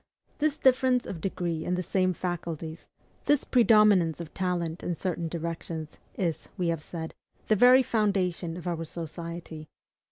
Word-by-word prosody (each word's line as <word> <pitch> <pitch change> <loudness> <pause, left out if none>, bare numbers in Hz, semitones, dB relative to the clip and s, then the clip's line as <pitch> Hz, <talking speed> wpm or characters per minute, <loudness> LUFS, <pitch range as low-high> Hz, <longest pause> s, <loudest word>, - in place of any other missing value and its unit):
This 305 0 +1
difference 255 -2 +3
of 170 -4 -6
degree 170 -3 -2
in 180 - 0
the 180 - -2
same 185 0 +1
faculties, 165 -2 -5 0.4
this 290 -2 +3
predominance 210 - +5
of 170 -2 -8
talent 175 -3 -2
in 175 - -2
certain 170 -1 -2
directions, 165 -1 -5 0.2
is, 170 -5 -2
we 180 -3 0
have 165 -2 -1
said, 160 0 -6 0.4
the 215 - +5
very 250 +4 +7
foundation 190 -7 0
of 180 - -9
our 170 -2 -2
society. 165 -1 -7
175 Hz, 150 wpm, -28 LUFS, 165-200 Hz, 0.4 s, very